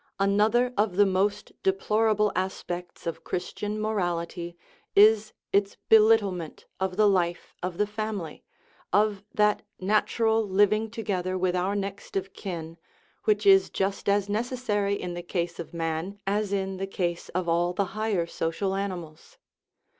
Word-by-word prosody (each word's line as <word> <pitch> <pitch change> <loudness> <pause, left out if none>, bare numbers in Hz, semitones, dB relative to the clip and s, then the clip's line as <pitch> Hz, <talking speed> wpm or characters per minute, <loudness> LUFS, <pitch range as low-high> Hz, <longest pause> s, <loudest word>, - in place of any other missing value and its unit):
V. 195 - +1
Another 220 +5 +3
of 205 -3 +1
the 205 +1 +6
most 200 +2 0
deplorable 210 +2 +2
aspects 180 -2 -4
of 165 - -4
Chris 180 0 -4
tian 210 +1 -3
morality 175 -5 -2 0.4
is 215 +1 +6 0.2
its 200 0 +2
belittlement 210 -6 +4
of 190 0 -2
the 215 -1 +5
life 175 -3 0
of 180 -1 -4
the 210 - +2
family, 210 -6 -5 0.5
of 205 -1 +2
that 210 0 +2 0.2
natural 220 +3 +2
living 205 +2 +2
together 185 -5 -2
with 185 0 +1
our 185 +3 0
next 200 0 -5
of 195 0 -2
kin 165 -3 -6 0.5
which 425 -1 +2
is 390 -1 +6
just 195 +1 -1
as 200 0 +2
necessary 210 -2 -1
in 180 -1 -4
the 175 - -5
case 175 -1 -3
of 170 - -6
man 165 +4 -3
as 205 +1 0
in 195 -1 -1
the 195 +1 -3
case 175 -3 -3
of 180 -1 0
all 170 +1 +2
the 195 +2 0
higher 215 -5 0
social 170 +4 -2
animals. 180 -6 -5
195 Hz, 150 wpm, -27 LUFS, 180-210 Hz, 0.5 s, the